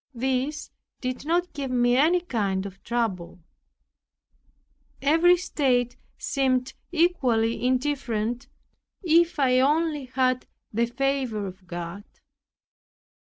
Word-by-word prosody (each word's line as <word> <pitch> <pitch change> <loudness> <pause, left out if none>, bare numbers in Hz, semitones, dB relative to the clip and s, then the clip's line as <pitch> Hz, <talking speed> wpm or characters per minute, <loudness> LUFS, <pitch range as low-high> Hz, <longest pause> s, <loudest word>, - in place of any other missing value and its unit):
This 265 +4 -2 0.3
did 255 +3 -4
not 350 +2 +1
give 275 -2 -4
me 245 -1 +3
any 325 +7 +4
kind 200 - -1
of 195 -1 -9
trouble. 215 -8 -2 1.6
Every 330 +5 +5
state 250 -8 0 0.2
seemed 260 -2 0 0.2
equally 255 -11 +1
indifferent 250 -3 -1 0.6
if 335 0 +3
I 255 -3 +3
only 300 +1 +1
had 255 0 0 0.3
the 235 +2 +1
favor 260 -4 -1
of 185 -1 -10
God. 175 +3 -6
255 Hz, 100 wpm, -25 LUFS, 230-295 Hz, 1.6 s, Every